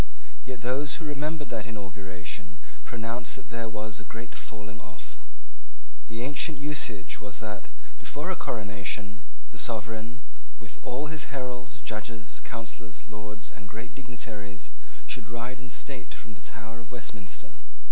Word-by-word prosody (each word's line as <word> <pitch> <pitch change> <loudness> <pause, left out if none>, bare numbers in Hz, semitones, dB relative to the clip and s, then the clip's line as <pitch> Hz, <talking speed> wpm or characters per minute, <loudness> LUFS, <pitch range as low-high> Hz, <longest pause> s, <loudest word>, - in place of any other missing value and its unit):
Yet 125 -3 0
those 140 +4 +6
who 165 - -2
remembered 150 -1 +3
that 110 -1 +3
inauguration 95 -3 -2 0.3
pronounced 115 0 +2
that 115 - -7
there 115 -1 +3
was 110 0 +1
a - - -4
great 115 0 -2
falling 105 0 -3
off. 95 -4 -7 0.9
The 110 +2 +1
ancient 145 +2 +5
usage 135 -11 +2
was 105 -3 -2
that, 105 -2 -1 0.3
before - - +2
a - - +5
coronation, 100 +1 +1 0.3
the 115 - -3
sovereign, 115 +2 +2 0.4
with 110 -2 -7
all 130 +5 +3
his 155 - +2
heralds, 125 -1 0
judges, 110 0 0
councillors, 115 -1 -2
lords, 105 +1 -2
and 105 -3 -7
great 110 +2 -3
dignitaries, 110 -6 -2 0.3
should 105 - +1
ride 120 +3 0
in 130 - -5
state - - -1
from 110 - -6
the 95 - -10
Tower 115 +3 -3
of 115 - -10
Westminster. 105 -6 -3
110 Hz, 145 wpm, -35 LUFS, 105-125 Hz, 0.9 s, those